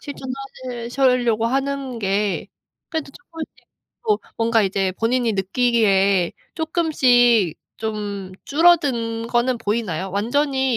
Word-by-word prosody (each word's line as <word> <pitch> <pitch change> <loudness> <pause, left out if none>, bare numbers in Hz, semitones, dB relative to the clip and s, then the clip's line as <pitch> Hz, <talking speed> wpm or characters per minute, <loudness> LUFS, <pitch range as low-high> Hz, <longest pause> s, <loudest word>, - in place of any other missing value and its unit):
실천하실 260 -3 -7
실려고 245 -4 +2
하는 270 -1 -2
게 200 0 -1 0.4
그래도 320 -4 -4
쪼끔씩 325 -4 -9 0.5
또 425 -2 +2 0.2
뭔가 225 -1 +2
이제 190 -1 0
본인이 235 0 +1
느끼기에 195 -3 +2 0.2
쪼끔씩 250 - +3 0.2
좀 205 -3 -4
줄어든 275 -8 +2
거는 240 0 +1
보이나요? 205 -5 -2
완전히 265 +5 +1
235 Hz, 245 characters per minute, -21 LUFS, 210-270 Hz, 0.5 s, 쪼끔씩